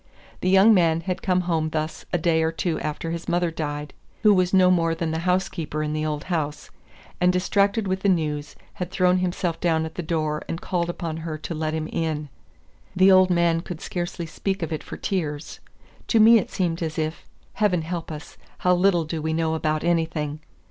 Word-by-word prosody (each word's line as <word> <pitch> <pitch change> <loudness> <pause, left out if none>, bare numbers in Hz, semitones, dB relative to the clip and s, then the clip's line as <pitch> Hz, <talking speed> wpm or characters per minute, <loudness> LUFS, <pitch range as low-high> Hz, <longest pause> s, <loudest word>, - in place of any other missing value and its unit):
The 185 - 0
young 195 +4 +7
man 165 -4 +3
had 180 +2 -3
come 185 -1 +2
home 165 -3 0
thus 155 0 -3
a 175 - +2
day 160 -1 +2
or 160 0 +1
two 165 0 -2
after 155 +2 -4
his 170 0 -5
mother 175 -1 +1
died, 150 -2 -4 0.3
who 210 -1 +7
was 185 -2 +2
no 185 -1 +5
more 165 -2 +2
than 165 -1 -2
the 160 - -1
housekeeper 180 -4 -1
in 150 0 -2
the 155 0 -1
old 150 -1 -3
house, 155 -5 -3 0.5
and 180 0 +5
distracted 200 +3 +1
with 190 0 0
the 200 - +1
news, 150 -4 -1 0.2
had 180 -1 -5
thrown 185 -1 +2
himself 180 -2 -1
down 160 -2 +1
at 160 - -7
the 180 - -4
door 155 -2 -1
and 165 - -3
called 175 -2 -2
upon 170 -2 -4
her 160 -1 -5
to 155 - -6
let 155 0 -2
him 155 0 -2
in. 155 -3 -2 0.7
The 190 +1 +6
old 185 0 +6
man 170 -2 +2
could 170 -2 -7
scarcely 175 -1 -4
speak 190 +3 -3
of 165 - -3
it 155 - -3
for - - -8
tears. 155 -6 -3 0.5
To 230 - +3
me 225 +1 +8
it - - -5
seemed 175 -3 -1
as 160 -2 -3
if 155 0 -3 0.3
Heaven 185 -6 +1
help 165 0 -5
us, 150 -1 -9 0.2
how 180 - +3
little 180 -1 +3
do 155 0 -4
we 160 +1 -1
know 160 0 0
about 155 -1 -1
anything! 160 -3 0
165 Hz, 210 wpm, -24 LUFS, 155-180 Hz, 0.7 s, me